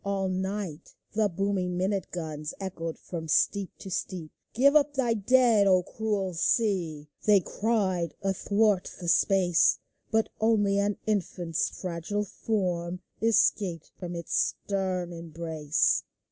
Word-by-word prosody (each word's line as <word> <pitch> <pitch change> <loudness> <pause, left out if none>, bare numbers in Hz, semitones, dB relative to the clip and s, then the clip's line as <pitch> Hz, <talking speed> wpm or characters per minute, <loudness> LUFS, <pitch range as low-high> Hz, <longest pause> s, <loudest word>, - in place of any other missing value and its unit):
All 195 -1 -1
night 190 -3 -4 0.2
the 215 -1 +2
booming 185 -1 -1
minute 190 +1 -1
guns 155 -3 -5
Echoed 165 -4 -5
from 165 -2 -6
steep 195 +4 +2
to 190 - -9
steep. 180 -3 -4
" - - -51
Give 280 +5 +5
up 290 -1 +4
thy 245 -4 +2
dead, 225 -1 +4
O 185 -1 +4
cruel 205 -3 -2
sea! 170 -5 0
" - - -21
They 205 -2 +7
cried 190 -3 -1
athwart 200 +1 +1
the 175 - -6
space; 180 0 +4 0.3
But 220 0 +1
only 205 -3 +3
an 200 0 0
infant's 180 -5 -1
fragile 180 +4 -3
form 180 -4 -2 0.2
Escaped 200 -6 +2
from 175 -2 -5
its 170 -1 -5 0.3
stern 185 -3 -1
embrace. 160 -2 0
190 Hz, 130 wpm, -28 LUFS, 170-210 Hz, 0.3 s, They